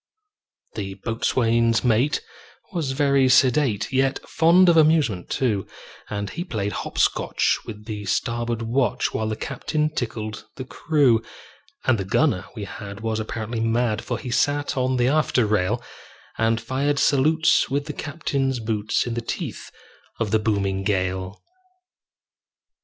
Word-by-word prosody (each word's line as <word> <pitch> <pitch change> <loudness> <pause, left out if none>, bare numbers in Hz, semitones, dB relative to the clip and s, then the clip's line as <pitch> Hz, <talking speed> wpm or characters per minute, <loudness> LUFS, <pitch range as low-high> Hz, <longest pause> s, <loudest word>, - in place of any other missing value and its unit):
The 95 -2 -5
boatswain's 115 +1 +1
mate 125 +4 +2 0.5
was 155 -7 -1
very 140 -2 +3
sedate, 125 -4 +3
Yet 135 +1 +2
fond 175 +3 +5
of 170 - +6
amusement, 150 - +3
too; 110 -7 0 0.4
And 100 -1 -4
he 175 - -4
played 110 - -3
hop - - -6
scotch - - +2
with 105 -1 -8
the 105 -2 -5
starboard 120 +2 -1
watch, 120 +3 0
While 110 0 -1
the 110 - -2
captain 150 +5 -2
tickled 110 -5 -4
the 130 - -6
crew. 135 -5 +2 0.6
And 125 -4 +3
the - - -1
gunner 95 0 +1
we 105 - -5
had 100 +1 -8
was 110 -1 -1
apparently 110 +1 -4
mad, 115 -1 0
For - - -3
he 125 - -6
sat 145 +3 +1
on 130 0 0
the 120 0 +2
after 140 -4 +2
rail, 105 +3 0 0.5
And 115 0 +1
fired 135 +5 -1
salutes 155 +4 +3
with 140 +1 -1
the - - -5
captain's 140 -4 -2
boots, 110 -1 -1
In 120 - -3
the 120 - -2
teeth 115 - -5 0.5
of 110 -3 -1
the 110 - +3
booming 100 -3 0
gale. 95 -1 -2
115 Hz, 145 wpm, -23 LUFS, 110-140 Hz, 0.6 s, of